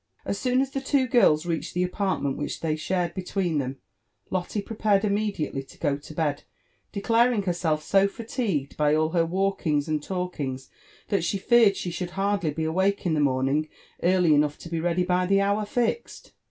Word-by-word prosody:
As 200 - -2
soon 255 0 +2
as 270 0 -2
the 275 - -3
two 270 -1 +1
girls 170 -10 +4
reached 165 -1 -3
the 180 - +2
apartment 180 -7 -1
which 145 - -4
they 155 -2 0
shared 175 +2 -1
between 180 -3 -1
them, 135 0 -3 0.5
Lotte 185 +3 -2
prepared 210 -2 +1
immediately 200 -9 -1
to 135 - -16
go 145 -3 0
to 145 +2 -11
bed, 150 -3 -1 0.5
declaring 230 +1 +2
herself 170 -4 0
so 195 0 +4
fatigued 205 - -3
by 150 0 +3
all 155 0 +2
her 165 -1 +1
walkings 175 -5 0
and 155 -1 -1
lalkings, 150 -7 -4 0.4
that 195 -5 +1
she 200 - 0
feared 215 0 +4
she 175 - -3
should 175 +1 -4
hardly 195 -4 +1
be 160 +2 -3
awake 190 +5 0
in 170 - +1
the 155 - +1
morning 140 +2 +1 0.3
early 180 -2 +4
enough 150 0 +2
to 170 - -10
be 165 -1 -2
ready 175 +2 +1
bv 180 0 +1
the 195 0 +4
hour 200 +1 +1
fixed. 240 - -2
180 Hz, 185 wpm, -26 LUFS, 155-200 Hz, 0.5 s, girls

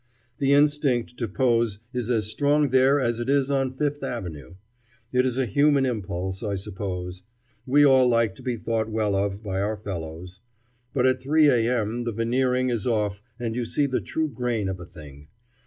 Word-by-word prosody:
The 140 0 +2
instinct 145 -5 +2
to 115 - -2
pose 115 -1 +1 0.2
is 125 -2 -3
as 115 -3 +1
strong 145 +6 +1
there 130 +2 +4
as 120 -3 0
it 120 +2 -3
is 140 -1 +2
on 135 -2 0
Fifth 145 0 -1
Avenue. 85 - -6 0.6
It 125 +1 +3
is 125 -1 -2
a 135 - +1
human 140 +4 +3
impulse, 95 -5 -3
I 105 -3 -2
suppose. 95 -2 -5 0.5
We 145 +3 +5
all 130 -2 +5
like 115 -4 +2
to - - -11
be 125 -2 -2
thought 110 0 -2
well 110 -2 0
of 100 +1 -1
by 95 -2 -2
our 105 +2 -1
fellows. 90 -1 -7 0.5
But 125 -2 +1
at 130 0 +2
3 150 +3 +4
A.M. 120 -2 +1
the 115 - -2
veneering 125 +3 +1
is 115 -3 -2
off 105 -4 0 0.2
and 115 -2 -3
you 125 - -1
see 140 +5 0
the 130 -2 -1
true 160 0 -2
grain 120 -5 -2
of 95 -1 -4
a 85 - -8
thing. 75 -4 -13
120 Hz, 190 wpm, -25 LUFS, 100-130 Hz, 0.6 s, We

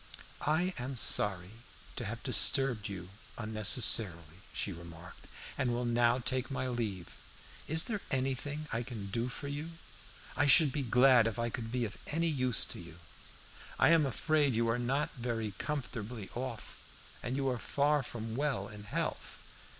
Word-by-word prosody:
"I 175 +5 +2
am 130 +1 -4
sorry 95 -4 +2 0.4
to 120 - -4
have 115 +3 -5
disturbed 130 -4 +3
you 90 -2 -7 0.3
unnecessarily," 110 - +2
she 100 - -2
remarked 85 0 -11 0.3
"and 130 -3 +1
will 120 +1 -1
now 120 0 +3
take 130 +1 -1
my 130 -1 -2
leave. 110 -8 -4 0.5
Is 160 +2 +3
there 210 -3 -3
anything 135 +3 -2
I 115 - 0
can 110 -5 -7
do 115 +4 -1
for 140 +3 -6
you? 150 +4 -5 0.6
I 145 - +2
should 150 0 +7
be 145 - -2
glad 125 -1 +5
if 115 - -3
I 115 0 -1
could 115 -2 -5
be 125 -1 0
of 105 - -7
any 165 +3 0
use. 130 -5 +1 1.1
I - - +5
am 165 -4 +5
afraid 145 0 +1
you 115 +1 +2
are 115 +2 +1
not 135 +5 0
very 115 -3 -2
comfortably 125 -7 -4
off, 125 -2 -6 0.4
and 120 +2 -3
you 135 0 0
are 125 -2 -2
far 145 +3 +1
from 115 -3 -6
well 135 -8 -1
in 105 -1 -10
health. 100 - -4
125 Hz, 160 wpm, -32 LUFS, 110-140 Hz, 1.1 s, should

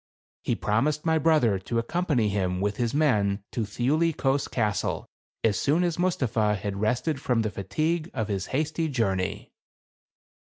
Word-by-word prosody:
He - - 0
promised 145 +9 0
my 160 -1 +3
brother 140 -11 +3
to 115 +5 -3
accompany 135 -1 +1
him 95 -3 -1
with 105 +1 -1
his 120 -2 0
men 105 -9 +2
to 120 - -2
Thiuli 145 +10 +1
Kos 135 +1 +1
Castle 105 -4 -1 0.4
as 110 -3 +2
soon 155 +5 +2
as 175 -1 -1
Mus 180 -1 +1
tapha 110 -4 +1
had 100 +1 -4
rested 125 +6 0
from 120 -3 +1
the 110 - -2
fatigue 155 - -1
of 110 -5 -2
his 100 -3 -2
hasty 155 +3 -1
journey. 95 -9 -1
120 Hz, 160 wpm, -26 LUFS, 105-155 Hz, 0.4 s, my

